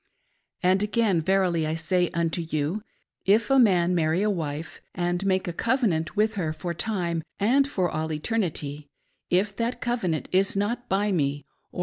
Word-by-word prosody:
5. 180 - +5
And 190 +1 +2
again, 210 -4 +2
verily 175 -2 +1
I 155 - -1
say 175 +2 +1
unto 170 0 -1
you, 160 +4 -2 0.4
if 210 +4 +3
a 270 - +6
man 180 -6 +4
marry 165 +2 +1
a 210 - +2
wife, 155 -3 -4
and 175 +1 -1
make 190 -1 +1
a 175 - -2
cov 245 +9 0
enant 160 -6 0
with 215 +1 +2
her 160 -4 -1
for 175 +2 -4
time, 170 -3 -2 0.2
and 265 +7 +3
for 190 -10 0
all 160 -1 -3
eternity, 150 -5 -2 0.4
if 195 +3 +1
that 235 +1 -1
covenant 225 - -1
is 195 +1 +2
not 235 +5 -2
by 200 +2 +1
me, 145 -5 0 0.3
or - - -8
180 Hz, 180 wpm, -26 LUFS, 160-210 Hz, 0.4 s, a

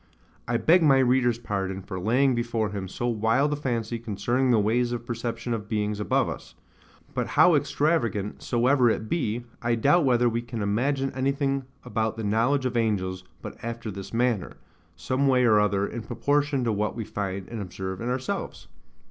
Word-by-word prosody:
I 120 0 +1
beg 165 +10 +4
my 140 -4 +5
reader's 125 -2 +3
pardon 95 -4 -3
for 95 -1 -6
laying 125 +8 +3
before 115 -3 -1
him 100 -2 -4
so 120 - -4
wild 120 +5 +2
a - - 0
fancy 120 -5 -2
concerning 120 +4 0
the 120 - +5
ways 120 +4 +1
of 120 -1 -4
perception 120 0 -3
of 105 -1 -5
beings 105 -2 -1
above 105 - +1
us; - - -7 0.6
but - - -1
how - - +5
extravagant 120 -10 0
soever 125 +1 +3
it 110 0 -1
be, 120 -5 -1 0.2
I 120 0 +1
doubt 145 +9 +3
whether 125 -2 +3
we 115 0 0
can 120 -2 -5
imagine 135 +7 0
anything 135 0 0 0.2
about 110 0 -1
the 110 - -4
knowledge 120 +6 +1
of 125 - -1
angels 95 -5 0 0.2
but - - -9
after 115 -1 -4
this 95 0 -8
manner, 115 -4 0 0.4
some 130 +12 0
way 125 -2 +4
or 110 -3 +5
other 100 -1 +2
in 115 +3 -5
proportion 145 +3 0
to 115 - +1
what 105 0 -1
we 115 - -3
find 95 -2 -4
and 115 -2 -6
observe 95 +1 -5
in 120 - -2
ourselves. 125 +1 -4
115 Hz, 180 wpm, -26 LUFS, 105-130 Hz, 0.6 s, my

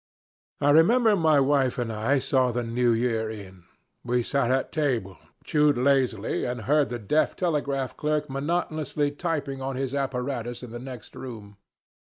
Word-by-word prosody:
I 145 0 +3
remember 215 +8 +5
my 160 -5 +4
wife 135 -2 +2
and 120 -2 -2
I 110 +7 +1
saw 130 -1 +1
the 120 +1 -2
New 120 +1 +1
Year 115 -1 0
in. 95 -5 -10 0.4
We 120 0 0
sat 135 0 0
at 130 +1 0
table, 120 - -1 0.2
chewed 150 -2 +2
lazily, 125 -5 +1
and 125 -1 -3
heard 145 +6 +2
the 120 - -3
deaf 120 +8 +1
telegraph 140 -6 -1
clerk 150 0 -1
monotonously 150 0 -1
tapping 145 -4 -3
on 135 0 -3
his 135 0 -3
apparatus 125 -3 -3
in 120 - -8
the 120 - -6
next 125 -3 -10
room. 105 -6 -9
130 Hz, 160 wpm, -26 LUFS, 120-145 Hz, 0.4 s, remember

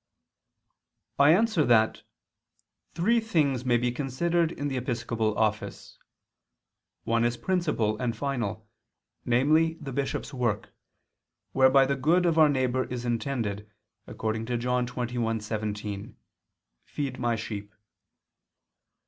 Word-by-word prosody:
I 140 +1 +7
answer 210 -2 +3
that, 110 -4 +3 0.9
Three 230 +8 +3
things 150 - +1
may 120 -1 +3
be 120 +1 0
considered 160 +6 0
in 145 -3 -4
the 135 - -3
episcopal 115 -3 -2
office. 110 -1 -2 1.0
One 115 0 +1
is 120 0 0
principal 150 - 0
and 120 -3 -1
final, 115 -5 -3 0.6
namely 155 +7 +3
the 145 -5 -8
bishop's 140 +1 -3
work, 120 -6 -2 0.8
whereby 135 +1 +5
the 140 +1 0
good 165 +7 +2
of 165 -2 +2
our 155 -1 +7
neighbor 130 -2 +1
is 125 -1 -5
intended, 115 -4 -2 0.4
according 110 0 -3
to 120 -1 -1
John 125 +1 0
21:17, 110 -4 -3 0.7
"Feed 135 -3 -5
My 120 -1 +1
sheep." 105 -2 -6
125 Hz, 115 wpm, -27 LUFS, 115-145 Hz, 1.0 s, I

